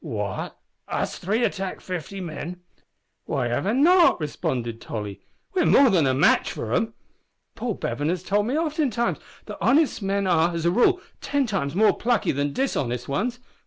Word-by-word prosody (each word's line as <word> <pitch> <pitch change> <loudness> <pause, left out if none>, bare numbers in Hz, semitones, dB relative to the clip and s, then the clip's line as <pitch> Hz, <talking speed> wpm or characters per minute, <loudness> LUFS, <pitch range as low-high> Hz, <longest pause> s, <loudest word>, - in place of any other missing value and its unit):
"What! 105 - -4 0.3
us - - -3
three 215 +6 0
attack 190 -4 -2
fifty 185 +2 -6
men?" 175 +1 -6 0.6
"Why 120 -1 -1
not?" 305 - +4
responded 120 -6 -3
Tolly, 105 -3 -6 0.3
"We're 365 -2 +2
more 270 -3 +6
than 165 -7 +3
a 130 - +2
match - - +3
for - - -4
'em. - - 0 0.6
Paul - - -3
Bevan 145 +2 -2
has 180 0 -2
told 205 +2 +1
me 265 +5 0
oftentimes 295 -8 0 0.3
that - - -8
honest 300 -4 +3
men 200 0 0
are, 170 -1 +2
as 165 0 -2
a 170 - +4
rule, 360 - +3 0.2
ten 285 -1 0
times 185 - -2
more 215 +2 +4
plucky 240 -1 +1
than 140 +1 -1
dishonest 125 - -2
ones. 235 - -1
190 Hz, 160 wpm, -24 LUFS, -, 0.6 s, more